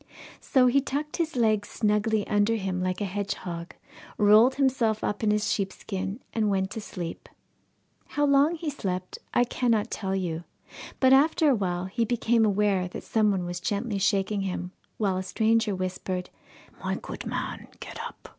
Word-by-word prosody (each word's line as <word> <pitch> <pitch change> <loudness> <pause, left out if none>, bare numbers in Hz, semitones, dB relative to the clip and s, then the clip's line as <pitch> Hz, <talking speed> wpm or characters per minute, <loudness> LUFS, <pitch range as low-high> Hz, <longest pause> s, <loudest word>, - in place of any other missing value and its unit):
So 260 -2 +3
he 260 +3 +4
tucked 290 +2 -3
his 330 -2 -1
legs 215 -3 +2
snugly 210 0 +1
under 210 +2 +2
him 190 -3 -2
like 185 +2 -1
a - - +1
hedgehog, 185 -3 -4 0.4
rolled 215 +5 +6
himself 255 -6 +1
up 205 - -1
in 215 - +3
his 210 0 +2
sheepskin, 195 +1 -3
and 215 -2 +1
went 190 -1 0
to 220 - -5
sleep. 175 -4 -7 0.8
How 290 - 0
long 285 +4 +4
he 320 -2 -3
slept, 185 -8 -4
I 245 - +4
cannot 235 -3 0
tell 195 -2 -2
you, 175 -3 -2 0.6
but 260 0 +6
after 300 +2 +5
awhile 185 -6 0
he 195 +5 -1
became 230 0 +2
aware 200 -3 +2
that 180 - -8
some 215 -2 +2
one 190 -3 0
was 175 0 -4
gently 205 +3 -2
shaking 195 +1 +1
him, 180 -2 -3 0.3
while 195 -4 +1
a - - -1
stranger 220 +2 +1
whispered, 185 0 -3 0.5
'My - - -1
good - - -7
man, - - -4
get - - -7
up! - - -8
210 Hz, 165 wpm, -27 LUFS, 190-235 Hz, 0.8 s, rolled